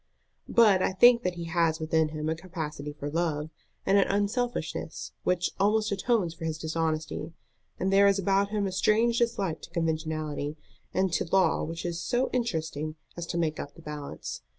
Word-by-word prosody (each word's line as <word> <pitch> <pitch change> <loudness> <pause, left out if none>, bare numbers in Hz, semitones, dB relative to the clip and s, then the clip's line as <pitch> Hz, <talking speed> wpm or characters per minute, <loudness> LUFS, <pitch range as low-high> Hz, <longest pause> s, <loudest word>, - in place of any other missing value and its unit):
"But 210 -5 +5
I 190 - +1
think 235 +5 +7
that 180 -5 -1
he 170 - -5
has 165 -1 +1
within 160 0 +1
him 155 0 -4
a 160 - +1
capacity 160 -4 -5
for 145 -1 -6
love, 160 -2 -1 0.3
and 200 +1 +5
an 195 - +3
unselfishness, 215 +5 -2
which 180 -1 +1
almost 215 +2 +2
atones 200 -3 +1
for 165 0 -10
his 160 -1 -2
dishonesty; 160 0 -2 0.5
and 190 +1 +1
there 200 +1 +7
is 200 0 +4
about 195 +1 +2
him 210 -1 0
a 190 - -1
strange 225 +5 +3
dislike 210 -8 0
to - - -10
conventionality 155 -3 -2 0.3
and 190 -2 +1
to - - +1
law 190 -1 +3
which 165 +2 -5
is 170 -1 -2
so 245 +9 0
interesting 160 - -2 0.2
as 170 -1 -5
to 170 - -3
make 160 -2 0
up 145 - -6
the - - -13
balance. 150 -2 -6
170 Hz, 180 wpm, -28 LUFS, 155-200 Hz, 0.5 s, think